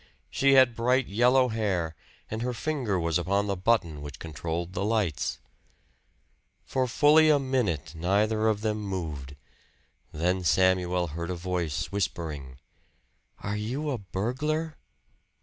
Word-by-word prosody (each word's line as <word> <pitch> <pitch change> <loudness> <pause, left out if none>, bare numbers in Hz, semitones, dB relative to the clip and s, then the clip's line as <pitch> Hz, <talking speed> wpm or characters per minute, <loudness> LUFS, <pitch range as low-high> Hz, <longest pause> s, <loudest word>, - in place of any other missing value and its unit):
She 135 0 +3
had 130 -3 +6
bright 125 +3 +2
yellow 125 +5 +3
hair, 95 -8 -1 0.4
and 110 +1 -3
her 125 0 -2
finger 115 -4 -1
was 85 0 +1
upon 100 +4 +1
the 100 -1 -1
button 90 -6 +1
which 70 -2 -8
controlled 85 +3 -4
the 95 - -2
lights. 105 -7 0 1.3
For 130 -1 0
fully 150 +5 +5
a 150 - +6
minute 125 - -1
neither 105 +6 +1
of 105 -2 +1
them 110 -1 -1
moved. 80 -9 -5 0.8
Then 90 +4 0
Samuel 90 0 +2
heard 85 +3 -5
a 90 - -2
voice 85 -3 -2
whispering: 80 -9 -3 0.9
"Are 100 +1 -2
you 130 +8 -2
a 125 - -2
burglar?" 140 - -2
100 Hz, 130 wpm, -27 LUFS, 85-120 Hz, 1.3 s, had